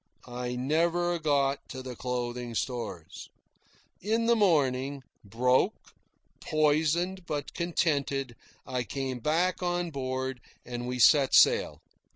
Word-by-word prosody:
I 125 0 -5
never 170 +6 +1
got 140 -3 +1
to 130 0 -7
the 130 -1 -7
clothing 120 -1 -4
stores. 105 - -5 0.7
In 225 +4 0
the 235 0 +4
morning, 140 - +1 0.2
broke, 125 +5 0 0.5
poisoned, 160 +4 +1
but 145 -2 -4
contented, 140 -7 -1 0.3
I 125 -1 -2
came 130 +3 -4
back 165 +9 0
on 175 -1 -1
board, 130 -2 -3 0.2
and 120 0 -5
we 125 0 -3
set 135 +2 +5
sail. - - +4
135 Hz, 115 wpm, -28 LUFS, 125-165 Hz, 0.7 s, set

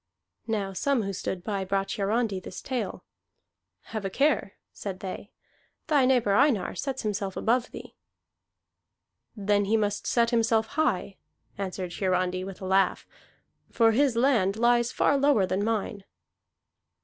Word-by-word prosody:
Now 205 -4 -2
some 255 +5 +1
who 195 0 -3
stood 185 -1 -4
by 200 -1 -2
brought 195 +1 -1
Hiarandi 210 -1 0
this - - -8
tale. 255 -3 -4 0.9
"Have 215 -2 -3
a 195 - -2
care," 265 -3 +1 0.2
said 190 -2 -6
they. 195 +2 -7 0.6
"Thy 285 -4 +3
neighbor 245 -6 +3
Einar 245 -6 +3
sets 270 -2 -4
himself 205 -2 -3
above 240 +2 +1
thee." - - -10 1.4
"Then 205 -1 +1
he 220 +3 +2
must 205 -1 -1
set 235 -1 +2
himself 225 -1 +2
high," 260 -10 -1 0.4
answered 185 -2 -4
Hiarandi 185 -1 0
with 195 0 -8
a - - -5
laugh, 190 0 +2 0.6
"for 225 -1 +4
his 265 +1 +2
land 230 -6 +2
lies 240 +1 +3
far 285 - +2
lower 275 -8 +4
than 190 +2 -1
mine." 210 -2 -2
210 Hz, 140 wpm, -27 LUFS, 195-240 Hz, 1.4 s, for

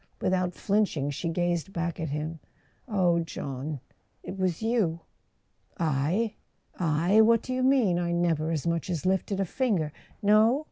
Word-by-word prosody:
" - - -38
Without 185 -1 0
flinching, 195 -9 0
she 165 +4 -3
gazed 175 +1 -1
back 170 0 -2
at 160 -2 -2
him. 155 +3 -4 0.5
"Oh, 180 -6 +2
John—it 145 +1 -7
was 185 0 -1
you! 210 -8 +1 0.4
" - - -45
"I—I? 170 +2 0
What 230 0 +4
do 255 - -4
you 255 - -1
mean? 255 -9 +3
I 170 -1 -1
never 165 -2 +1
as 160 -2 -2
much 170 +1 -1
as 170 -2 -2
lifted 190 +1 0
a 195 - +1
finger 185 - 0 0.2
" - - -30
"No?" 215 +6 +5
175 Hz, 155 wpm, -28 LUFS, 160-205 Hz, 0.5 s, No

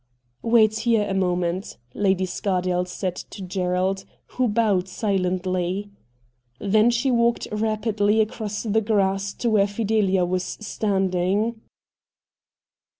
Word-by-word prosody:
'Wait 220 -2 +4
here 225 -2 +2
a 195 - -2
moment,' 180 -1 -1 0.2
Lady 190 -2 +1
Scardale 180 -1 -1
said 180 0 -3
to 195 - -9
Gerald, 185 +1 -1 0.3
who 255 -1 0
bowed 205 -4 +1
silently. 185 0 -1 0.7
Then 215 - +3
she 240 +3 +1
walked 235 -1 +2
rapidly 215 0 +1
across 215 -1 -2
the 220 0 +1
grass 200 -2 +1
to 240 - -2
where 205 -2 +4
Fidelia 200 -3 +1
was 180 +1 -1 0.2
standing. 200 +1 0
200 Hz, 110 wpm, -23 LUFS, 185-220 Hz, 0.7 s, Wait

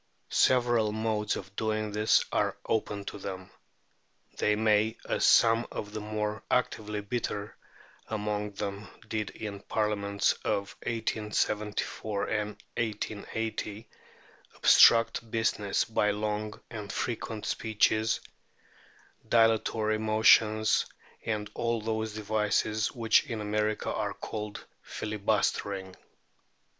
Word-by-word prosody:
Several 120 -4 +3
modes 110 -1 -1
of 100 +1 -8
doing 110 -1 -1
this 105 +1 +3
are - - 0
open 105 -2 -1
to 100 - -6
them. 95 -1 -7 0.9
They 105 - +3
may, 110 0 +2
as - - +1
some 115 +1 +5
of 105 0 -6
the 110 - -3
more 105 0 -3
actively 105 -4 0
bitter 105 -1 -3 0.5
among 105 -1 -2
them 100 0 -5 0.2
did 110 -2 -2
in 105 -2 -6
the - - -23
Parliaments 100 -2 +1
of 100 0 -1
1874 105 -2 -1
and 105 -1 0 0.3
1880, 110 0 -3 0.7
obstruct 115 0 +6
business 110 -3 0
by 110 -2 +1
long 105 0 -2
and 105 -3 -6
frequent 110 -2 -3
speeches, 110 0 +1 1.1
dilatory 110 -1 +3
motions, 110 0 +4 0.4
and 105 -2 -2
all 115 0 -1
those 110 0 -2
devices 110 0 0
which 115 +2 +3
in 115 -4 -4
America 105 +1 -1
are - - -2
called 105 -1 -6 0.2
filibustering. 100 -2 -1
110 Hz, 105 wpm, -29 LUFS, 105-110 Hz, 1.1 s, obstruct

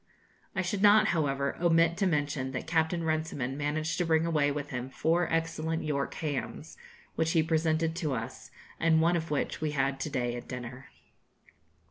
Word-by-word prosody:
I 190 - 0
should 190 +2 -2
not, 210 +1 +6
however, 140 -4 0
omit 165 -1 +4
to 195 0 +2
mention 145 -5 -1
that 130 - -4
Captain 160 +1 +1
Runciman 155 -5 -1
managed 155 +3 -1
to 175 - +2
bring 160 0 +3
away 150 -4 +2
with 145 0 -4
him 125 0 -4
four 165 +5 +1
excellent 165 0 -1
York 140 -2 -2
hams, 145 -5 -4 0.4
which 160 0 0
he 160 - +4
presented 160 0 +1
to 155 -7 -1
us, 115 -1 -6 0.3
and 160 -1 +4
one 170 +2 +3
of 165 -1 -2
which 150 +1 -2
we 155 -1 -1
had 135 -1 0
to 145 - -3
day 120 -4 -1
at 120 - -7
dinner. 125 +1 -7
155 Hz, 175 wpm, -29 LUFS, 140-165 Hz, 0.4 s, not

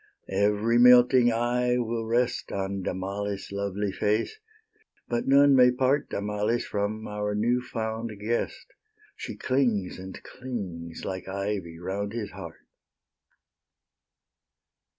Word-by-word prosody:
Every 105 +4 +2
melting 125 0 +7
eye 125 +1 +1
will 115 -1 -2
rest 120 +2 0
On 95 0 -3
Damalis' 100 +2 -4
lovely 100 0 -2
face; 105 - -1 0.7
but 120 0 -2
none 140 +1 +6
may 125 -1 +7
part 130 +3 +1
Damalis 105 +3 -1
from 105 +2 -3
our 105 0 -2
new 120 +4 +1
found 115 -1 -4
guest; 115 +3 -2 0.5
She - - -7
clings, 120 -9 0
and 95 0 -8
clings, 95 -10 -7
like 95 -1 -5
ivy, 95 -3 -3
round 100 +4 -4
his 115 -3 -4
heart. 90 -4 -10
105 Hz, 110 wpm, -27 LUFS, 100-120 Hz, 0.7 s, melting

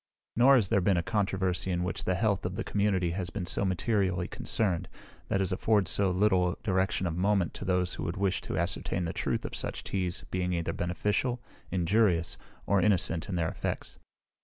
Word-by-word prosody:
Nor 130 +4 +6
has 110 -7 +2
there 100 -4 +3
been 95 0 +2
a 85 - 0
controversy 95 -4 0
in 90 -1 0
which 90 - -3
the 95 - +1
health 100 -1 0
of 90 +1 -3
the - - -3
community 95 -4 0
has 90 0 -3
been 85 - -4
so 95 - +3
materially 95 -1 0
concerned, 95 -7 +2 0.4
that 95 - 0
has 95 - 0
afforded 100 +1 +2
so 100 -1 +4
little 90 -1 +2
direction 95 -1 0
of 85 -2 -2
moment 95 0 +1
to - - -7
those 90 -1 +1
who - - -5
would 85 +4 -3
wish 95 -1 0
to - - -4
ascertain 85 +1 -1
the 80 - -3
truth - - -2
of - - -5
such - - -3
teas 90 -2 -3
being 90 -1 -1
either 85 -1 -2
beneficial, 105 +8 -1 0.3
injurious, 90 -1 +1 0.3
or 100 -1 +2
innocent 90 -5 +1
in 95 - -2
their 80 -2 0
effects. 100 - -5
95 Hz, 195 wpm, -29 LUFS, 90-100 Hz, 0.4 s, Nor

